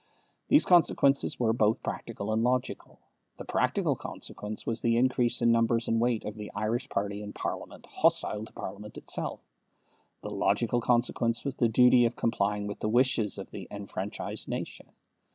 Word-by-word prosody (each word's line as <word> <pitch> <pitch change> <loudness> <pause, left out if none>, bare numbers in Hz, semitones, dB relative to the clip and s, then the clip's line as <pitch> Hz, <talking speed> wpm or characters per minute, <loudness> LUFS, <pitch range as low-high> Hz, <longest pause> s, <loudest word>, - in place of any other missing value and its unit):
These 295 - +5
consequences 145 -4 +3
were 115 -2 +2
both 110 -1 +1
practical 105 +2 -4
and 110 +1 +1
logical. 125 +1 -1 0.4
The - - -8
practical - - +1
consequence 105 +1 -7
was 115 0 -2
the 115 0 +2
increase 120 -1 +2
in 115 - +5
numbers 115 0 +2
and 115 0 +1
weight 120 -2 0
of 105 - -4
the 105 -1 -8
Irish 110 +5 -1
party 100 +1 -2
in 105 0 -7
Parliament - - -5
hostile 105 - +1
to - - -15
Parliament 105 +1 -8
itself. - - -3 0.8
The - - -5
logical 120 0 +1
consequence 120 0 +1
was 140 - -1
the 120 -2 +1
duty 125 +1 +6
of 115 - -1
complying 105 -2 0
with 105 0 -5
the 105 - -1
wishes 120 -3 +2
of - - -8
the - - -8
enfranchised 100 0 -5
nation. - - -5
115 Hz, 165 wpm, -29 LUFS, 105-120 Hz, 0.8 s, duty